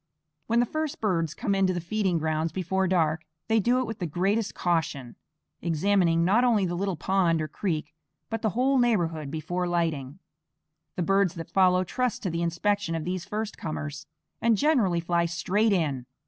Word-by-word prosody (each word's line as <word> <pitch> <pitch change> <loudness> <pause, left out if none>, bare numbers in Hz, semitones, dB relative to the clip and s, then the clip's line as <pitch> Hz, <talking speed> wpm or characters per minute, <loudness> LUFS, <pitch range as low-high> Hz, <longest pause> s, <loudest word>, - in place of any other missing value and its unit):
When 230 +1 +2
the - - +2
first 310 +3 -3
birds 165 -7 0
come 200 - -1
in 195 -1 +3
to 185 - +1
the - - -1
feeding 185 +1 0
grounds 160 +1 -1
before 190 +1 0
dark, 160 -3 +1 0.3
they 225 0 +3
do 240 +5 +2
it 255 - 0
with 225 -2 -6
the 175 - -2
greatest 195 +7 0
caution, 150 -8 -1 0.5
examining 170 0 +2
not 210 +7 +4
only 225 -6 +3
the 175 - -2
little 190 +1 -1
pond 170 +1 +1
or 155 - -2
creek, 155 -4 -3 0.3
but 225 -1 -4
the 220 - +1
whole 265 +1 +3
neighborhood 170 - +1
before 170 +4 -3
lighting. 160 -5 -1 0.8
The 180 - -1
birds 195 -1 +2
that 165 -1 -8
follow 185 -1 +4
trust 250 +6 -2
to 185 - -1
the 170 +1 -2
inspection 170 +2 0
of 160 - -3
these 180 -1 -3
first 215 +2 -4
comers, 150 -1 -5 0.3
and 230 -2 +3
generally 210 - +2
fly 170 0 +1
straight 195 +6 +1
in. 145 -9 0
180 Hz, 185 wpm, -27 LUFS, 165-205 Hz, 0.8 s, not